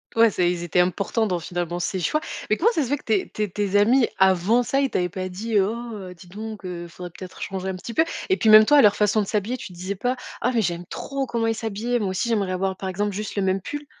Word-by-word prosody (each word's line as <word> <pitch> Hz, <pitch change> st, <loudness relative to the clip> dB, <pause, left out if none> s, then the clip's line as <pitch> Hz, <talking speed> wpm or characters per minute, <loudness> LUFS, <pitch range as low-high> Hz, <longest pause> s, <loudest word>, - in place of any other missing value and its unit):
Ouais, 230 Hz, 0 st, +6 dB
c'est 180 Hz, -2 st, +1 dB
ils 175 Hz, -1 st, -2 dB
étaient 175 Hz, +1 st, 0 dB
importants 200 Hz, +5 st, +1 dB
dans, 180 Hz, -3 st, -1 dB
finalement, 175 Hz, +1 st, -3 dB
ces 185 Hz, +2 st, -2 dB
choix 305 Hz, -, 0 dB, 0.3 s
mais 215 Hz, -, +4 dB
comment 440 Hz, -, +3 dB
ça 320 Hz, -, +1 dB
se -, -, -3 dB
fait 285 Hz, +4 st, 0 dB
que -, -, -17 dB
tes 215 Hz, -4 st, +1 dB
tes 210 Hz, -1 st, -2 dB
tes 200 Hz, +1 st, -2 dB
amis, 235 Hz, +5 st, +4 dB
avant 190 Hz, +5 st, +4 dB
ça, 270 Hz, +3 st, 0 dB
ils 275 Hz, -1 st, +1 dB
t'avaient 180 Hz, -1 st, 0 dB
pas 185 Hz, +1 st, -4 dB
dit: 210 Hz, +4 st, -1 dB
«Oh, 210 Hz, -2 st, -3 dB
dis 180 Hz, +1 st, -15 dB
donc 215 Hz, +3 st, -7 dB
heu, 175 Hz, -1 st, -5 dB
il 170 Hz, -, -10 dB
faudrait 180 Hz, +1 st, -9 dB
peut-être 185 Hz, -1 st, -10 dB
changer 190 Hz, -2 st, -4 dB
un 190 Hz, -, -2 dB
petit 210 Hz, +6 st, -7 dB
peu» 320 Hz, -, +3 dB, 0.2 s
et 380 Hz, -, +3 dB
puis 220 Hz, -, +2 dB
même 215 Hz, 0 st, +9 dB
toi, 295 Hz, -, +5 dB
à -, -, +8 dB
leur 205 Hz, -3 st, +5 dB
façon 210 Hz, +1 st, +2 dB
de 200 Hz, -, -3 dB
s'habiller, 215 Hz, +5 st, -1 dB
tu -, -, -8 dB
te 185 Hz, -, -13 dB
disais 185 Hz, +3 st, -4 dB
pas: 245 Hz, +6 st, -1 dB, 0.3 s
«Ah 250 Hz, -, +2 dB
mais 230 Hz, -, +3 dB
j'aime 175 Hz, -2 st, -2 dB
trop 275 Hz, +7 st, -4 dB
comment 230 Hz, -1 st, -1 dB
ils 225 Hz, -, +2 dB
s'habillent, 225 Hz, +2 st, -2 dB
moi 205 Hz, -3 st, -1 dB
aussi, 190 Hz, +5 st, -1 dB
j'aimerais 200 Hz, -5 st, 0 dB
avoir, 190 Hz, +1 st, -1 dB
par 190 Hz, -, -5 dB
exemple, 205 Hz, +3 st, -1 dB
juste 210 Hz, +2 st, -5 dB
le 200 Hz, -, 0 dB
même 190 Hz, 0 st, +1 dB
pull»? 290 Hz, +8 st, -6 dB
205 Hz, 285 wpm, -23 LUFS, 185-230 Hz, 0.3 s, même